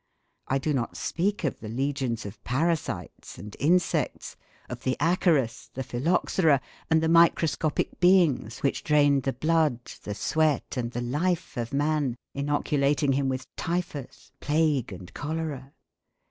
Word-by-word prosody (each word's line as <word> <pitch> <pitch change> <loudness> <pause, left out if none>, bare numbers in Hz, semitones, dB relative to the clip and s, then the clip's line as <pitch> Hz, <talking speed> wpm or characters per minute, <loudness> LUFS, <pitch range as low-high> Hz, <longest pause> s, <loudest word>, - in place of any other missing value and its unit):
I 135 - +1
do 150 +3 -1
not 125 -4 -2
speak 195 +4 -1
of 145 - -1
the 110 - -7
legions 130 -2 -2
of 100 0 -9
parasites 160 +6 -2
and 105 0 -9
insects, 175 +5 +1 0.3
of - - -7
the 130 - -1
acarus, 165 -6 +1
the 130 - -3
phylloxera, 145 +4 +2 0.3
and 160 0 +3
the - - +2
microscopic 165 -2 +2
beings 175 - +3
which 140 - 0
drained 145 -2 +4
the 135 0 -1
blood, 155 -3 +1 0.2
the 105 - -5
sweat, 155 +4 0
and 120 -2 -2
the 120 0 -4
life 155 +8 -1
of 120 -1 -3
man, 145 -3 0 0.2
inoculating 145 0 +1
him 135 0 +1
with 130 0 -3
typhus, 170 -6 -4
plague, 145 -5 +1
and 90 -1 -10
cholera. 145 -3 -4
145 Hz, 140 wpm, -27 LUFS, 130-160 Hz, 0.3 s, drained